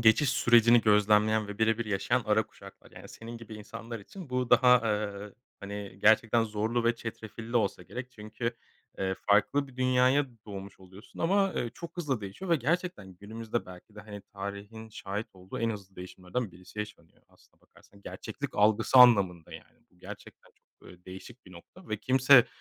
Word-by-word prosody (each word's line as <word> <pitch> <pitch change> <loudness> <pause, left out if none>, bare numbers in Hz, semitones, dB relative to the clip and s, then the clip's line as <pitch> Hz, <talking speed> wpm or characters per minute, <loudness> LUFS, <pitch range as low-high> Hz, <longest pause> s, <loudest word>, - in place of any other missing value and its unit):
geçiş 115 +6 +5
sürecini 120 -2 +5
gözlemleyen 105 0 +3
ve 105 +1 -8
birebir 110 +1 +1
yaşayan 100 -2 0
ara - - +2
kuşaklar. - - -16
Yani, - - -12
senin 115 +1 -9
gibi 115 -1 -10
insanlar 115 +2 -8
için 165 - -11
bu 125 -1 -1
daha, 125 0 +6
eee, 105 -2 -3 0.3
hani, 100 -1 -7
gerçekten 115 +1 +4
zorlu 110 +2 -1
ve 115 0 +3
çetrefilli 115 +1 -6
olsa 100 -5 0
gerek. 125 +6 -8
Çünkü, 115 +1 -5 0.4
eee, 95 0 -1
farklı 105 +8 +3
bir 125 - -17
dünyaya 130 +2 +3 0.2
doğmuş 100 -1 -9
oluyorsun 95 +3 -15
ama, 195 +3 +2
eee, 120 - -2
çok 170 +1 -9
hızlı 140 -9 -2
değişiyor 100 - -7
ve 170 - +5
gerçekten 140 - -2
günümüzde 110 +4 -5
belki 90 +3 -13
de, 105 - -9
hani, 105 -1 -9
tarihin 100 +3 -7
şahit 105 0 -5
olduğu 95 0 -9
en 115 0 0
hızlı 100 -3 -9
değişimlerden 90 +4 -5
birisi 90 +4 -14
yaşanıyor. 105 -6 -8
Aslına - - -28
bakarsan 100 - -22
gerçeklik - - -7
algısı 110 +4 +3
anlamında, 100 -9 +5
yani, - - -13
bu - - -29
gerçekten - - -12
çok, - - -22
eee, 90 0 -17
değişik 95 +6 -12
bir 95 - -14
nokta 170 - -15
ve 105 - -1
kimse 130 -1 +6
110 Hz, 170 wpm, -29 LUFS, 100-120 Hz, 0.4 s, daha